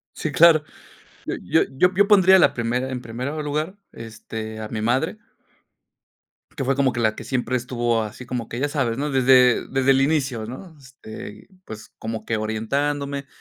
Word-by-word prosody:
Sí, 155 - -3
claro. 160 -1 +6 0.6
Eh, - - -4
yo - - +2
yo 180 +8 +2
yo 200 +2 +3
pondría 190 -2 +6
la - - +4
primera 120 +2 -2
en 125 -1 -4
primer 120 +2 -6 0.2
lugar, 155 +5 -3 0.2
este, 110 -1 -8
a 110 - -5
mi 110 - -4
madre 130 - 0 1.4
que 135 - -2
fue 135 +1 +1
como 135 -1 +2
que 120 - -4
la 110 -2 +1
que - - -8
siempre 130 -1 -2
estuvo 120 -2 -1
así 110 +3 -7
como 120 -2 -5
que 120 - -5
ya 145 - +1
sabes, 130 -6 -1
¿no? 145 +2 -2
Desde 130 -2 +4
desde 135 0 +2
el 135 0 +3
inicio, 135 -6 0
¿no? 160 - -10
Este, 125 -5 -11 0.2
pues 110 0 -10
como 110 -1 -5
que 115 - -1
orientándome, 140 +6 -2
130 Hz, 180 wpm, -22 LUFS, 115-145 Hz, 1.4 s, claro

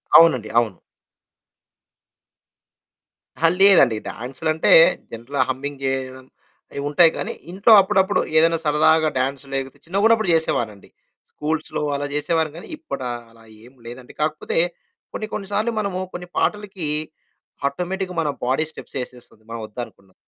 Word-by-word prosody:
అవునండి. 130 -10 +6
అవును. 110 -6 -2 2.6
అహా! 165 +1 +3
లేదండి. 180 - +7
డాన్సులంటే 155 +7 -1 0.4
జనరల్‌గా 125 +4 -3
హమ్మింగ్ 140 +1 -4
చేయడం, 130 -1 -3 0.5
అయి 140 - -5
ఉంటాయి 160 +3 +5
గానీ - - -3 0.2
ఇంట్లో 200 +5 +4
అప్పుడప్పుడు 190 0 +1 0.2
ఏదైనా 165 +1 +4
సరదాగా 155 +1 +3
డాన్స్ 135 +2 -1
లేకపోతే 135 -1 -4
చిన్నగున్నప్పుడు 210 +3 +2
చేసేవానండి. 115 -10 -1 0.4
స్కూల్స్‌లో 155 +1 -3
అలా 145 0 -3
చేసేవాని 160 +1 0
కానీ, 170 - -10
ఇప్పుడు 305 - -6 0.3
అలా 115 0 -20 0.2
ఏం 125 - -16
లేదండి. 125 +1 -10
కాకపోతే 155 0 -2 0.6
కొన్ని 215 - -4
కొన్ని 195 -2 -4
సార్లు 215 +3 0
మనము 200 -3 -2
కొన్ని 180 0 -7
పాటలకి 200 -5 -2 0.8
ఆటోమేటిక్‌గా 180 +5 -4
మన 155 - -1 0.2
బాడీ 130 +5 +1
స్టెప్స్ 140 - -10
ఏసేస్తుంది. 120 -3 -15
మనం 115 -1 -5
వద్దనుకున్నా. 105 -4 -10
155 Hz, 120 wpm, -21 LUFS, 130-180 Hz, 2.6 s, లేదండి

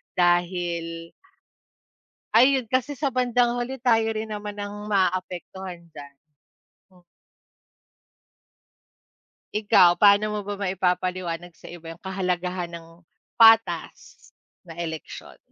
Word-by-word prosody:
dahil 175 -2 -1 1.2
Ayun, 255 -1 +4
kasi 260 +3 0
sa 275 0 -2
bandang 245 -1 +1
huli 245 +2 -3
tayo 225 -3 +3
rin 220 0 -5
naman 210 -1 -6
ang 205 0 -7
maaapektuhan 185 -2 -2
diyan. 145 -2 -12 0.8
M 180 - -22 2.5
Ikaw, 205 -5 +4
paano 205 +1 +5
mo 210 - -3
ba 205 - -3
maipapaliwanag 180 -2 -2
sa - - -13
iba 170 -1 -10
yung 165 - -10
kahalagahan 180 -2 -3
ng 165 -1 -10 0.5
patas 225 0 +3 0.3
na 170 -2 -12
eleksyon? 160 -3 -7
190 Hz, 100 wpm, -24 LUFS, 175-220 Hz, 2.5 s, paano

